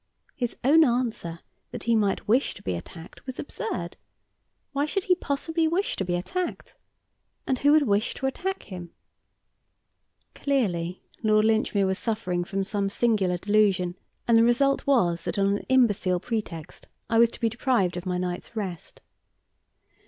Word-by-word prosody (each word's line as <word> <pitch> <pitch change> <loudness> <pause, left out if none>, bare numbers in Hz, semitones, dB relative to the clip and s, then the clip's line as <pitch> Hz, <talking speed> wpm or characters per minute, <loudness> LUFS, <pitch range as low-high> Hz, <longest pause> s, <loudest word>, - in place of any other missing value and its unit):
His 245 -5 -3
own 310 +5 +6
answer 235 - -1 0.3
that - - -7
he 230 0 +2
might 205 -3 0
wish 245 +6 +2
to - - -13
be 95 - -1
attacked 160 - -9
was 260 - -5
absurd. 450 +9 -4 0.7
Why 285 +1 0
should 390 +5 -1
he 370 - +4
possibly 325 0 -1
wish 360 +5 0
to - - -2
be 175 -1 -1
attacked? 350 - -4 0.7
And 260 -2 0
who 285 - +4
would 310 -1 +6
wish 205 +2 +1
to 265 - -4
attack 380 +8 -2
him? 180 -3 -8 1.4
Clearly, 185 -11 -1 0.2
Lord 215 -1 +3
Linchmere 220 -2 +2
was 190 0 0
suffering 190 -6 -1
from 195 +2 -2
some 200 0 -1
singular 200 -5 +1
delusion, 195 -2 +2 0.3
and 235 - +5
the 225 - +6
result 275 +5 +2
was 175 -11 +3
that - - -3
on 200 0 +2
an - - -12
imbecile 205 -8 +3
pretext 185 -8 -5 0.2
I 225 - +2
was 235 0 +6
to - - -8
be 230 - +2
deprived 225 -6 +1
of 180 +1 -5
my 180 -1 0
night's 180 +4 -4
rest. 190 -7 -6
215 Hz, 160 wpm, -26 LUFS, 185-260 Hz, 1.4 s, own